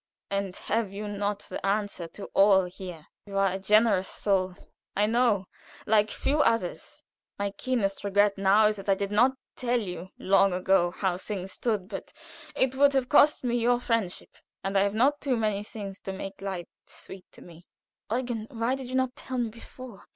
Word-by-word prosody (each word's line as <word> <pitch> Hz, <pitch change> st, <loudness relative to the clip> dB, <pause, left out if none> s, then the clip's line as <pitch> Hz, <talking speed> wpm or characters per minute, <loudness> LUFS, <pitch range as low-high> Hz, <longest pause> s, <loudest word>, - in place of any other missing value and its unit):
And 200 Hz, -2 st, -2 dB
have 220 Hz, -3 st, -1 dB
you 205 Hz, +1 st, -5 dB
not 205 Hz, 0 st, -2 dB
the -, -, -7 dB
answer 200 Hz, -3 st, -1 dB
to 200 Hz, -, -9 dB
all 195 Hz, -1 st, +6 dB
here? 180 Hz, -3 st, -9 dB, 0.2 s
You 200 Hz, -1 st, -4 dB
are 195 Hz, -2 st, +3 dB
a 190 Hz, -, -3 dB
generous 210 Hz, -1 st, +3 dB
soul, 190 Hz, -3 st, 0 dB, 0.4 s
I 205 Hz, -, +3 dB
know, 225 Hz, -3 st, +2 dB, 0.4 s
like 210 Hz, 0 st, +3 dB
few 290 Hz, +7 st, 0 dB
others. 230 Hz, -10 st, -1 dB, 0.3 s
My 200 Hz, 0 st, -1 dB
keenest 205 Hz, -4 st, -1 dB
regret 205 Hz, 0 st, +3 dB
now 195 Hz, +2 st, +4 dB
is 210 Hz, 0 st, +2 dB
that 195 Hz, +1 st, -7 dB
I 195 Hz, -, +5 dB
did 200 Hz, +1 st, -3 dB
not 245 Hz, +6 st, +4 dB, 0.2 s
tell 245 Hz, -1 st, 0 dB
you 180 Hz, -4 st, -6 dB
long 195 Hz, 0 st, +3 dB
ago 185 Hz, -1 st, +3 dB
how 180 Hz, 0 st, -1 dB
things 190 Hz, -1 st, -5 dB
stood, 210 Hz, -5 st, -2 dB
but 195 Hz, -2 st, -7 dB, 0.4 s
it 260 Hz, -1 st, +2 dB
would 280 Hz, +1 st, +4 dB
have 265 Hz, -2 st, +1 dB
cost 295 Hz, -1 st, +5 dB
me 240 Hz, -1 st, +1 dB
your 240 Hz, +1 st, +3 dB
friendship, 230 Hz, -7 st, -2 dB, 0.3 s
and 195 Hz, +1 st, -2 dB
I 195 Hz, -, +5 dB
have 200 Hz, +1 st, +1 dB
not 275 Hz, +6 st, +3 dB
too 265 Hz, -4 st, 0 dB
many 210 Hz, -2 st, 0 dB
things 200 Hz, -2 st, -8 dB
to 195 Hz, -, -6 dB
make 195 Hz, 0 st, -7 dB
life 190 Hz, -3 st, -4 dB, 0.2 s
sweet 190 Hz, -1 st, -11 dB
to -, -, -14 dB
me." 170 Hz, 0 st, -15 dB, 0.4 s
"Eugen, 240 Hz, -2 st, -2 dB
why 235 Hz, 0 st, -1 dB
did 265 Hz, -1 st, -5 dB
you 255 Hz, -, -4 dB
not 260 Hz, -1 st, +1 dB
tell 260 Hz, -, -6 dB
me 240 Hz, -2 st, 0 dB
before? 230 Hz, -1 st, -12 dB
205 Hz, 190 wpm, -27 LUFS, 195-235 Hz, 0.4 s, all